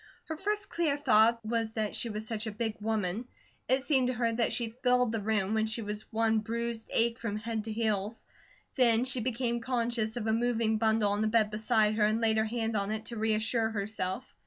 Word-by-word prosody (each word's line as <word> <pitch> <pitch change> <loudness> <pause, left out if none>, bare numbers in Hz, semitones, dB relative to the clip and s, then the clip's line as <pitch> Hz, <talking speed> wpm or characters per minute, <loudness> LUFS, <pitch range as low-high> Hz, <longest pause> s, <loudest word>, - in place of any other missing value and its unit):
Her 320 - -4
first 415 +4 -2
clear 315 -4 0
thought 230 -4 +4
was 225 0 -1
that 215 -2 -2
she 235 - -3
was 215 0 -4
such 220 -1 -4
a - - -2
big 220 0 -3
woman; 215 +1 -1 0.4
it 260 +1 +3
seemed 265 -4 +2
to 255 - -1
her 235 -1 +1
that 230 0 +1
she 230 -2 -1
filled 250 -2 +3
the 225 -2 -2
room, 210 -1 0
when 220 0 +1
she 220 +1 -2
was 210 +2 -6
one 225 0 +2
bruised 230 +1 -3
ache 230 +1 +2
from 225 -3 -3
head 220 0 -4
to 225 - -4
heels. 215 -1 -1 0.5
Then 240 -2 +4
she 260 -1 -2
became 235 0 -1
conscious 235 -2 -1
of 225 - -3
a 220 - +1
moving 230 -2 +1
bundle 220 -2 +2
on 205 +1 0
the 220 - +2
bed 215 -1 +2
beside 215 0 +2
her, 215 - +3
and 215 +1 +1
laid 220 -1 +2
her 220 - +2
hand 225 0 -2
on 200 -1 0
it 220 0 -3
to 235 - -6
reassure 220 +1 +1
herself. 205 +1 -3
225 Hz, 220 wpm, -30 LUFS, 215-235 Hz, 0.5 s, thought